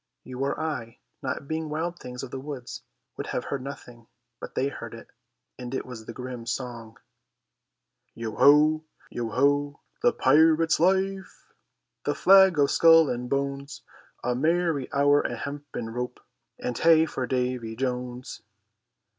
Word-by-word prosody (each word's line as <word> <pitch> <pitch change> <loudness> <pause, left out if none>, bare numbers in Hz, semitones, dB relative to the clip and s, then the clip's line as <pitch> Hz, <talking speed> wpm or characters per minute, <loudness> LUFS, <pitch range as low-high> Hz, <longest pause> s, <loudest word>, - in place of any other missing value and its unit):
You 130 0 -9
or 135 +1 -1
I, 130 -8 -4 0.2
not 135 0 -4
being 160 0 -3
wild 170 +3 -3
things 125 0 -7
of 130 - -7
the 135 - -5
woods, 135 -3 -7 0.3
would - - -5
have - - -2
heard 140 - -4
nothing, 120 -3 -10 0.3
but - - -9
they 135 - +1
heard 115 -4 -8
it, 115 - -13 0.5
and 125 +1 -5
it - - -3
was 115 -3 -9
the - - -5
grim 125 -1 -7
song: 120 -2 -5 1.2
"Yo 115 -1 -4
ho, 155 +2 +5 0.3
yo 120 -1 -3
ho, 145 +4 +1 0.2
the 245 - +4
pirate 160 - +4
life, 190 +2 0 0.5
The - - 0
flag 190 -3 +6
o' 145 - +5
skull 165 +2 +6
and 125 0 -4
bones, 140 0 -3 0.4
A 125 - 0
merry 160 0 0
hour, 145 0 +4
a - - -3
hempen 140 -5 -6
rope, 125 +1 -4 0.4
And 125 - -4
hey 160 +3 +5
for 130 -5 -4
Davy 125 -3 -2
Jones." 125 0 -4
140 Hz, 150 wpm, -26 LUFS, 125-155 Hz, 1.2 s, flag